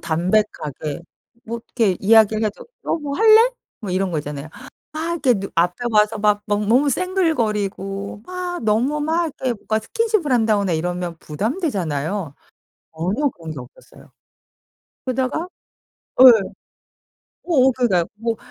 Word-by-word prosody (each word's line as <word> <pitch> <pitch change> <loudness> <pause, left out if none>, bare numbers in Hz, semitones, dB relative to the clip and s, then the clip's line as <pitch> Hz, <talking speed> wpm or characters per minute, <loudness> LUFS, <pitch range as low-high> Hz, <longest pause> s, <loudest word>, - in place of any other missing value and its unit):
담백하게 165 -4 -1 0.4
뭐 230 +1 -5 0.2
이렇게 200 -7 +2
이야기를 220 +1 +4
해도 210 - -4 0.2
"너 - - -1
뭐 285 -2 -4
할래?" 445 +2 +6 0.3
뭐 200 -4 -5
이런 185 0 0
거 160 - -1
있잖아요. 145 0 -6 0.4
막 320 +2 -3
이렇게 275 -8 +2
누 195 -1 -4
앞에 175 +1 +2 0.2
와서 210 0 +3
막 210 0 +2
넘 205 0 -1
너무 275 +5 +4
생글거리고 210 - -1
막 360 -3 -5
너무 240 +8 +1
막 325 +3 +1 0.2
이렇게 255 -2 +1
뭐가 220 +1 -2
스킨십을 430 - -1
한다거나 215 -6 +2
이러면 175 +1 -3
부담되잖아요. 180 - -3 0.6
전혀 205 - 0
그런 165 -7 -10
게 140 - -7
없었어요. 125 +1 -15 0.9
그러다가 260 +6 -1 0.7
예. - - +10 1.2
어어 265 -7 +4
그러니까요. 220 -9 +1
뭐 230 +1 -2
215 Hz, 300 characters per minute, -21 LUFS, 185-280 Hz, 1.2 s, 예